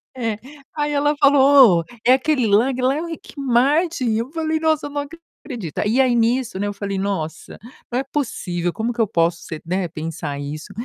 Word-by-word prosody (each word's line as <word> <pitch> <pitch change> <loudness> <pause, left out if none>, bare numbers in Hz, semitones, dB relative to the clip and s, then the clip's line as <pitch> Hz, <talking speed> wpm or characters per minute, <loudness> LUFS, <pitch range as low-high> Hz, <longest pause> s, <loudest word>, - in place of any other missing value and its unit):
É, 225 -4 -2 0.4
aí 295 -1 -1
ela 290 +1 +1
falou: 275 -7 +6
"Ou, - - -3 0.2
é 250 - +7
aquele 265 -2 +1
lá 220 +6 +3
lá 260 +2 +2
é 315 - -2
o 340 - -5
Rick 325 - -9
Martin", 275 +2 +1
eu 235 +5 -3
falei: 315 -1 -1
"Nossa 315 -2 +1
eu 290 - -6
não 290 0 -2 0.4
acredito". 235 - -6
E 240 +5 +1
aí 255 -2 +4
nisso, 235 -2 0
né, 205 - -1
eu 205 - -3
falei: 200 -1 -4
"Nossa, 190 -6 -4 0.3
não 245 - -1
é - - -1
possível, 180 - -3
como 230 +4 -3
que 235 - -1
eu 215 - +2
posso 170 -3 +1
ser 160 -2 -7
né, 180 +1 -1
pensar 155 -3 -5
isso?" 150 +6 -7
240 Hz, 205 wpm, -21 LUFS, 190-285 Hz, 0.4 s, é